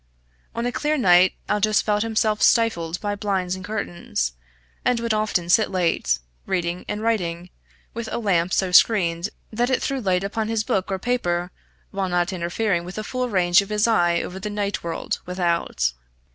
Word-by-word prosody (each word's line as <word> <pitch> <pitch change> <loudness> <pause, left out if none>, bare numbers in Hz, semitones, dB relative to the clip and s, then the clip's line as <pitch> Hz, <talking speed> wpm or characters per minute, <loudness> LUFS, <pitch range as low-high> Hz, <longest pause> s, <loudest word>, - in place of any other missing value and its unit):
On 235 +1 -2
a 245 - 0
clear 300 +4 0
night 185 -6 +5
Aldous 210 0 +2
felt 210 -1 +1
himself 220 -1 0
stifled 180 -8 +2
by 205 -1 -1
blinds 195 -3 -1
and 185 - -9
curtains, 175 - -3 0.5
and 245 -2 +2
would 230 -1 -1
often 215 -5 0
sit 215 +5 +4
late, 170 - +1 0.3
reading 175 -1 -2
and 210 +1 -3
writing, 180 -6 -1 0.4
with 230 -1 -5
a - - -1
lamp 185 -6 +1
so 190 -2 +1
screened 180 -2 +4 0.2
that 240 +3 +1
it 260 - +2
threw 275 -1 -2
light 185 -3 +1
upon 215 +2 -2
his 225 -1 0
book 195 -2 -1
or 190 - 0
paper, 180 -6 -1 0.4
while 195 -1 -2
not 175 +1 0
interfering 175 +1 -1
with 180 +2 -8
the 215 - -4
full 250 +3 -2
range 180 -1 +4
of 200 - -8
his 210 +1 +2
eye 175 -6 +2
over 185 +1 -6
the 210 +2 -4
night 205 -1 -2
world 170 -1 -3
without. 170 - 0
195 Hz, 180 wpm, -23 LUFS, 175-220 Hz, 0.5 s, night